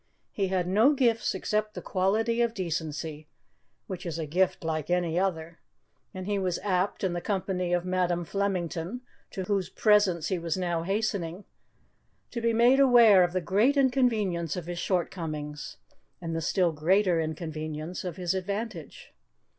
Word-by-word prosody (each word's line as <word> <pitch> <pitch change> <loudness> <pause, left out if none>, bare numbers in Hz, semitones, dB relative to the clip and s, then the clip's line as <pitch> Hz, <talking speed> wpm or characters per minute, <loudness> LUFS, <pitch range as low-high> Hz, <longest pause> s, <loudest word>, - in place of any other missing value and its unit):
He 195 -2 -1
had 185 -2 0
no 220 +10 +4
gifts 235 -7 +1
except 215 +2 -1
the - - -4
quality 220 +5 +1
of 235 -1 +1
decency, 160 -4 -4 0.6
which 185 -3 -6
is 165 - -4
a 160 - -3
gift 180 +5 0
like 155 -1 -2
any 175 -1 +1
other; 170 -3 -2 0.5
and 185 0 -7
he 205 0 -1
was 185 -3 -1
apt, 190 0 0
in 185 -2 0
the 175 - -3
company 185 -2 -2
of 175 0 +1
Madam 180 -1 0
Flemington, 190 +2 -2 0.3
to 190 - -5
whose 190 -2 -1
presence 205 -7 +3
he 185 - -1
was 165 +1 -2
now 175 -2 -1
hastening, 195 -1 -2 0.9
to 235 - -4
be 230 0 +2
made 240 +4 +4
aware 235 -8 +7
of 175 - 0
the 185 0 -1
great 215 - +2
inconvenience 225 - +1
of 180 -3 -5
his 175 0 -5
shortcomings, 155 -5 -3 0.4
and 165 -2 -4
the 165 - -1
still 175 +2 +1
greater 175 +3 +2
inconvenience 155 +1 -5
of 180 -3 -5
his 180 -1 -1
advantage. 200 -3 -5
185 Hz, 160 wpm, -28 LUFS, 170-205 Hz, 0.9 s, aware